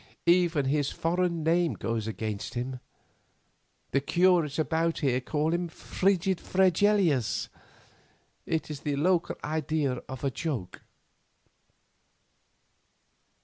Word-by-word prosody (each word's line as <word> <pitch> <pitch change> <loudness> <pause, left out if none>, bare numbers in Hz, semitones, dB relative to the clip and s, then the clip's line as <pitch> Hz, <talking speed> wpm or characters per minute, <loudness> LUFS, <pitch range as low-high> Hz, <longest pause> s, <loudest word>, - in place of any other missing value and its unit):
Even 170 -4 +3
his 140 +1 +1
foreign 170 -1 0
name 170 +1 +2
goes 115 -1 -3
against 110 +1 -4
him. 125 +1 -3 1.1
The 140 - +2
curates 170 -1 +2
about 165 +1 0
here 130 -3 +1
call 155 +5 0
him 175 0 -1
'Frigid 190 +2 0
Fregelius.' 185 - +2 1.0
It 160 -1 -1
is 145 - -5
the 145 0 -2
local 170 +4 +1
idea 150 -4 -1
of 130 +1 -7
a 140 - +1
joke. 130 - -4
155 Hz, 105 wpm, -28 LUFS, 135-175 Hz, 1.1 s, Even